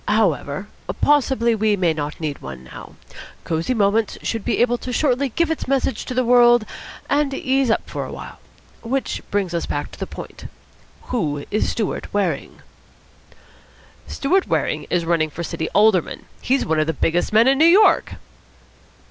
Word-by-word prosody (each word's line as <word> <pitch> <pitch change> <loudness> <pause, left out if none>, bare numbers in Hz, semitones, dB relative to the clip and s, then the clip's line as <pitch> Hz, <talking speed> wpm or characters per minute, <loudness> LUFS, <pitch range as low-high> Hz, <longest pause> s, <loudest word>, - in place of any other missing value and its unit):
However, 200 -5 0 0.3
possibly 265 -5 +3
we 215 -1 +2
may 175 -4 +1
not 150 -1 -5
need 150 -3 -4
one 65 -1 -8
now. 65 - -12 0.5
Cosy 165 +10 -1
Moments 210 0 +1
should 225 -3 -2
be - - 0
able 245 0 +2
shortly 260 +1 0
to - - -25
give 335 -1 +1
its 320 - -3
message 270 0 0
to 255 - -5
the 255 0 +1
world 240 -1 +5 0.4
and 285 -1 +1
ease 270 -4 +1
up 225 - 0
for - - -4
a - - -7
while. - - -9 0.4
Which 260 +3 -2
brings 195 -3 -1
us 170 - -2
back - - -3
to - - -13
the - - -4
point. - - -9 0.7
Who 145 - -1
is 215 - 0
Stewart 220 -3 -3
Waring?" 200 -3 -2 1.4
"Stewart 365 +7 0
Waring - - -1
is 175 -2 0
running 165 -2 +1
for 170 +3 -6
City 160 0 -4
Alderman. 210 -4 +2 0.2
He's 270 +2 +1
one 160 0 +1
of 155 - +1
the 160 - 0
biggest 165 +3 0
men 220 +3 +5
in 270 +1 +3
New 320 - +6
York!" 380 +6 +5
220 Hz, 170 wpm, -21 LUFS, 170-260 Hz, 1.4 s, New